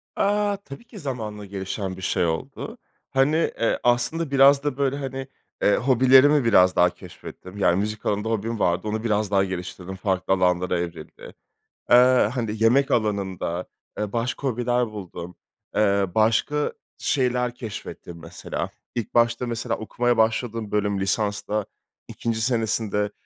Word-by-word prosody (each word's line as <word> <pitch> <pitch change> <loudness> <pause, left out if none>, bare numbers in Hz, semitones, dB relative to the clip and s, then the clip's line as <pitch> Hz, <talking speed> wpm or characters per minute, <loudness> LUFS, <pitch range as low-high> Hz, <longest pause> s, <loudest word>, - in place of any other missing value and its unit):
Aaa. 205 0 +1
Tabii 195 -1 -11
ki 230 -3 -12
zamanla 110 - -5
gelişen 95 -1 -5
bir - - -9
şey 90 -1 +1
oldu. 80 -1 -4 0.3
Hani, 135 +3 +2 0.2
eee, 115 - +1
aslında 125 +6 +1
biraz 140 +1 +6
da, 145 -3 -2
böyle, 140 -1 0
hani, 135 -1 -5 0.3
eee, 100 - +4
hobilerimi 130 +3 +5
biraz 90 -5 +5
daha 90 0 +5
keşfettim, 90 +2 -12
yani, 90 -3 +3
müzik 105 +1 -3
alanında 105 +2 0
hobim 115 +1 -2
vardı, 90 +4 +1
onu 110 +1 -2
biraz 105 -2 0
daha 95 -1 +4
geliştirdim, 95 0 -6
farklı 95 -1 0
alanlara 90 -1 +1
evrildi. 85 -2 -7 0.6
Eee, 125 -2 +6
hani, 110 -3 -2
yemek 135 +5 +4
alanında, 95 -6 -1 0.3
eee, 105 -1 -3
başka 120 +4 -2
hobiler 120 0 0
buldum, 90 -4 -8 0.4
eee, 100 -2 +3
başka 115 +7 +2 0.2
şeyler 125 -2 0
keşfettim 100 -7 -8
mesela. - - -5 0.3
İlk 120 -4 -4
başta 120 +1 +2
mesela 115 0 -2
okumaya 120 +2 0
başladığım 110 -1 0
bölüm 105 -1 0
lisansta, 105 +1 -1 0.4
2'nci 115 -1 -3
senesinde, 110 -3 0
110 Hz, 140 wpm, -24 LUFS, 100-125 Hz, 0.6 s, biraz